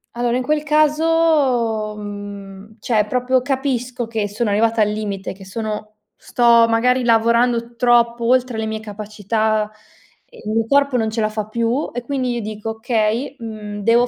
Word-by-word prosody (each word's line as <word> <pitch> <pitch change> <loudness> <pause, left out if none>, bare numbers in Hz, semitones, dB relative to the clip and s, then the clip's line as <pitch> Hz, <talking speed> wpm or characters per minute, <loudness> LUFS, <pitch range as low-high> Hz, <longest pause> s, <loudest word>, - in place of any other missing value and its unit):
Allora, 240 0 0
in 255 - -2
quel 300 +2 0
caso, 300 -8 +2
mhmm, 205 0 -9
cioè, 215 -1 +1
proprio 250 +3 +1
capisco 255 -3 -2
che 220 -2 -2
sono 210 +2 -2
arrivata 225 +2 +2
al 210 - +3
limite, 205 -2 -4
che 190 0 -13
sono 215 +1 -5 0.2
sto, 235 -1 +4
magari, 250 +3 +2
lavorando 235 +1 +2
troppo 235 -1 +2
oltre 250 -1 +2
le 220 - -2
mie 220 0 -3
capacità, 215 0 -2 0.6
il 210 - -10
mio 225 +1 +1
corpo 280 0 +3
non 220 -1 0
ce 220 0 -2
la 215 - +1
fa 215 -1 -3
più 235 +5 -1
e 245 - -3
quindi 255 -1 -2
io 235 - -3
dico: 215 +1 -5
"Okay, 225 +3 -1
mhmm, 215 -2 -7
devo 235 +2 +4
230 Hz, 160 wpm, -19 LUFS, 215-245 Hz, 0.6 s, sto